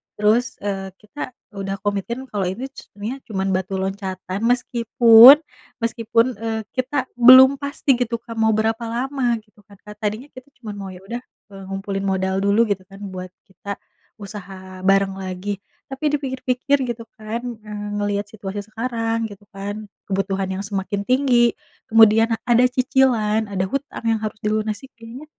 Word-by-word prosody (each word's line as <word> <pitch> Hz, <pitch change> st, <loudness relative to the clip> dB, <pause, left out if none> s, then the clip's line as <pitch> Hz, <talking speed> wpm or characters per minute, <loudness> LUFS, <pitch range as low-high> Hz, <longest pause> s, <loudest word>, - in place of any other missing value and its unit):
terus, 215 Hz, +4 st, +2 dB
eee, 195 Hz, -1 st, -3 dB
kita 250 Hz, +5 st, -8 dB, 0.2 s
udah 195 Hz, 0 st, -4 dB
komitin 205 Hz, +6 st, -2 dB
kalau 205 Hz, -7 st, -2 dB
ini 235 Hz, +8 st, -5 dB
c -, -, -14 dB
ininya 220 Hz, +6 st, -4 dB
cuman 195 Hz, -2 st, -1 dB
batu 190 Hz, +1 st, -2 dB
loncatan, 190 Hz, -1 st, -4 dB
meskipun 235 Hz, +1 st, +7 dB, 0.5 s
meskipun, 230 Hz, 0 st, +2 dB
eee, 225 Hz, -1 st, -2 dB
kita 260 Hz, +1 st, -1 dB
belum 260 Hz, +3 st, +9 dB
pasti 280 Hz, -1 st, +1 dB
gitu, 235 Hz, -1 st, 0 dB
Kak, 230 Hz, -, -8 dB
mau 220 Hz, 0 st, +3 dB
berapa 225 Hz, +1 st, 0 dB
lama 245 Hz, +1 st, -1 dB
gitu 210 Hz, -1 st, -28 dB
kan, 200 Hz, -, -16 dB
Kak. 210 Hz, 0 st, -11 dB
Tadinya 215 Hz, +7 st, -3 dB
kita 255 Hz, +1 st, -12 dB, 0.2 s
cuman 210 Hz, -2 st, -6 dB
mau, 195 Hz, -, -6 dB
"Ya 180 Hz, -, -12 dB
udah, 235 Hz, +5 st, -5 dB, 0.3 s
eee, 195 Hz, 0 st, -9 dB
ngumpulin 195 Hz, 0 st, -3 dB
modal 190 Hz, 0 st, 0 dB
dulu," 205 Hz, +3 st, +4 dB
gitu 190 Hz, -1 st, -1 dB
kan 195 Hz, 0 st, -14 dB
buat 185 Hz, 0 st, -6 dB, 0.2 s
kita 200 Hz, +2 st, -7 dB, 0.5 s
usaha 190 Hz, -2 st, -9 dB
bareng 195 Hz, 0 st, +3 dB
lagi. 190 Hz, +1 st, -4 dB, 0.3 s
Tapi 270 Hz, +3 st, -5 dB
dipikir-pikir 260 Hz, 0 st, 0 dB
gitu 230 Hz, -1 st, -5 dB
kan, 220 Hz, +2 st, -4 dB
eee, 210 Hz, -3 st, -6 dB
ngelihat 205 Hz, 0 st, -1 dB
situasi 200 Hz, -1 st, -6 dB
sekarang 230 Hz, 0 st, -2 dB
gitu 205 Hz, 0 st, -13 dB
kan, 205 Hz, +2 st, -6 dB, 0.2 s
kebutuhan 195 Hz, 0 st, -1 dB
yang -, -, -6 dB
semakin 200 Hz, 0 st, -3 dB
tinggi 250 Hz, -3 st, +3 dB, 0.4 s
kemudian 225 Hz, +1 st, +6 dB, 0.2 s
ada 240 Hz, +1 st, +5 dB
cicilan, 250 Hz, -4 st, +2 dB
ada 190 Hz, -1 st, -1 dB
hutang 275 Hz, -2 st, -4 dB
yang 225 Hz, -, +2 dB
harus 215 Hz, 0 st, -4 dB
dilunasi 215 Hz, +3 st, -2 dB
kayaknya 235 Hz, +5 st, -10 dB
215 Hz, 155 wpm, -21 LUFS, 195-240 Hz, 0.5 s, belum